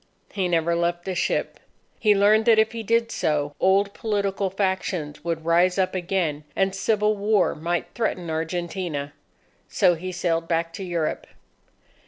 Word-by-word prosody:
He 190 -3 -1
never 170 -1 +1
left 175 0 -1
the 190 - -2
ship. 180 - -1 0.4
He 210 -2 +4
learned 210 +2 +4
that 230 -2 +5
if 220 0 +3
he 230 -1 -5
did 230 +1 +1
so, 145 -1 -1
old 200 +1 +3
political 200 -3 -1
factions 185 -5 -2
would 165 -1 -3
rise 175 +2 +3
up 190 -1 +1
again, 175 -5 -1
and 195 0 +1
civil 210 +1 +1
war 205 +1 +2
might 170 +2 -2
threaten 185 -7 -2
Argentina. 160 -2 -3 0.6
So 190 -8 +3
he 180 +3 -5
sailed 170 -2 -1
back 165 0 -1
to 195 - -6
Europe. 170 -4 -2
185 Hz, 155 wpm, -24 LUFS, 165-200 Hz, 0.6 s, that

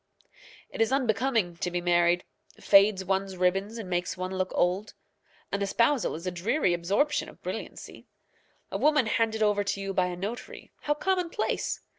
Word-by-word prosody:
It - - -4
is 225 - +3
unbecoming 230 -7 +1
to 180 - -2
be 175 0 -2
married 175 0 +3 0.4
fades 195 -1 +5
one's 190 0 -1
ribbons 195 +5 0
and 220 -4 -6
makes 175 -1 -2
one 185 +1 -4
look 185 0 -1
old. 185 +4 0 0.6
An 200 - -1
espousal 230 +6 +1
is 165 +3 -8
a 185 - -1
dreary 190 - +1
absorption 195 - 0
of - - -18
brilliancy. - - -7 0.6
A - - -2
woman 300 -4 +4
handed 220 0 +1
over 205 -1 +2
to 200 0 -2
you 195 0 -3
by 185 -1 +2
a 180 - -4
notary, 205 +7 -7
how 295 - 0
commonplace! 365 +3 -1
195 Hz, 165 wpm, -28 LUFS, 180-230 Hz, 0.6 s, fades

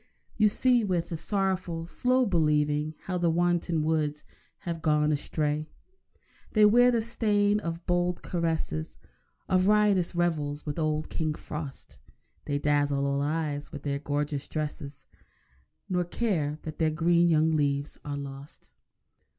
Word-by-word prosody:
You 215 -1 +4
see, 245 +3 +3
with 180 -5 -1
a - - -1
sorrowful, 185 -2 -2
slow 255 +8 +1
believing, 150 -4 +1
How 180 -2 -2
the 170 -1 +2
wanton 175 -1 +1
woods 150 -1 0 0.4
have 170 -4 -4
gone 150 -1 +2
astray. 150 +1 -1 0.8
They 215 -1 +6
wear 245 +4 +6
the 235 -2 +2
stain 210 -3 +1
of 170 -3 -5
bold 175 0 0
caresses, 160 - -2 0.5
Of 185 0 +2
riotous 205 -4 +3
revels 150 -4 -1
with 150 +1 -3
old 155 -1 -1
King 155 -2 -1
Frost; 150 -3 -8 0.5
They 145 - -1
dazzle 145 -1 +1
all 140 0 0
eyes 150 -1 -2
with 145 - -8
their 140 -1 -2
gorgeous 145 0 -2
dresses, 145 -2 -5 0.8
Nor 180 -1 0
care 170 -7 -1
that 155 -1 -7
their 160 -1 +3
green 170 +2 +3
young 160 -1 +3
leaves 145 -2 -1
are 145 -1 -4
lost. 140 0 -9
160 Hz, 140 wpm, -28 LUFS, 150-180 Hz, 0.8 s, They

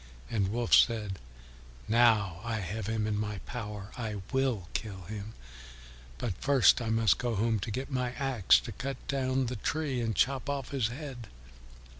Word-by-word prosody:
And 105 -4 +1
Wolf 115 +4 -1
said, 105 -5 +4 0.7
"Now 110 -6 +3
I 115 -1 -2
have 105 0 -4
him 110 -1 0
in 105 -1 0
my 105 -1 -2
power. 105 -4 -6
I 105 -5 -4
will 130 -9 +1
kill 100 -5 -4
him; 105 +3 -7 0.8
but 115 -6 -2
first 135 -3 +5
I 115 - -2
must 110 -3 +3
go 120 -2 -1
home 110 +1 +1
to 95 - -4
get 130 +6 -4
my 125 -2 -1
axe 130 -8 +4
to - - -7
cut 135 +5 -4
down 130 -1 0
the 125 0 -3
tree 140 +1 -1
and 115 -2 -1
to - - -4
chop 135 +1 -5
off 140 -2 -3
his 130 -5 +1
head." 125 -2 -7
115 Hz, 175 wpm, -30 LUFS, 105-130 Hz, 0.8 s, first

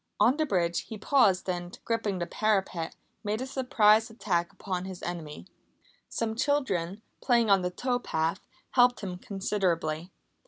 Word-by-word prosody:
On 235 +6 +5
the 310 -1 +1
bridge 175 -6 0
he 220 - -6
paused 200 -5 +3
and, 175 -1 -3
gripping 225 -4 0
the 175 - -2
parapet, 190 -4 0 0.3
made 210 +1 -1
a 260 - -3
surprise 225 -4 +3
attack 190 -6 -1
upon 185 -2 -4
his 190 -2 -8
enemy. 165 -4 -5 0.6
Some 225 -1 -1
children, 220 - 0 0.2
playing 235 -4 +3
on 195 -1 +6
the 180 - 0
tow 245 +7 -1
path, 165 -4 -1 0.3
helped 245 -2 +4
him 180 -3 -5
considerably. 180 -5 -1
195 Hz, 150 wpm, -29 LUFS, 175-230 Hz, 0.6 s, on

